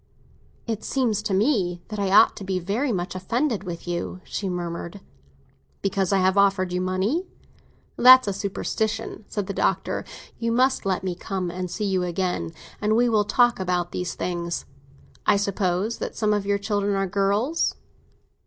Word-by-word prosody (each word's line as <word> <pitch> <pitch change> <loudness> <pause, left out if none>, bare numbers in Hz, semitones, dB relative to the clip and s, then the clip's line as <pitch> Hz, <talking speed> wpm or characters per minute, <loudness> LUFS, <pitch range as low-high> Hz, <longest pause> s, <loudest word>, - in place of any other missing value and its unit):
"It 225 -2 -3
seems 240 -7 0
to 215 -1 -3
me 190 -5 +1
that 210 -1 -5
I 200 -1 0
ought 195 - +6
to - - -7
be 190 -1 -1
very 210 +10 -1
much 180 -3 -2
offended 230 +6 -1
with 175 -1 -7
you," 175 +1 -3
she 195 - -4
murmured. 175 +1 -4 0.8
"Because 195 -1 0
I 195 - +4
have 190 +1 +3
offered 195 -2 +2
you 180 - 0
money? 190 - 0 0.7
That's 255 -1 +8
a 200 - 0
superstition," 215 +2 -3
said 205 -2 -3
the 200 - -4
Doctor. - - 0 0.4
"You 230 0 0
must 255 -3 +2
let 190 -1 0
me 185 -1 -1
come 180 0 -4
and 180 +1 -4
see 210 +4 -3
you 190 -2 +1
again, 180 - -2 0.3
and 215 +1 +2
we 240 +1 +4
will 215 -2 +3
talk 240 +2 +3
about 180 -1 -1
these 180 -1 -3
things. 170 -1 -3 0.6
I - - +5
suppose 200 +1 -1
that - - -4
some 215 -1 +1
of 205 -1 -1
your 200 0 +2
children 200 0 0
are 195 0 +1
girls." 200 - +1
195 Hz, 170 wpm, -24 LUFS, 180-215 Hz, 0.8 s, That's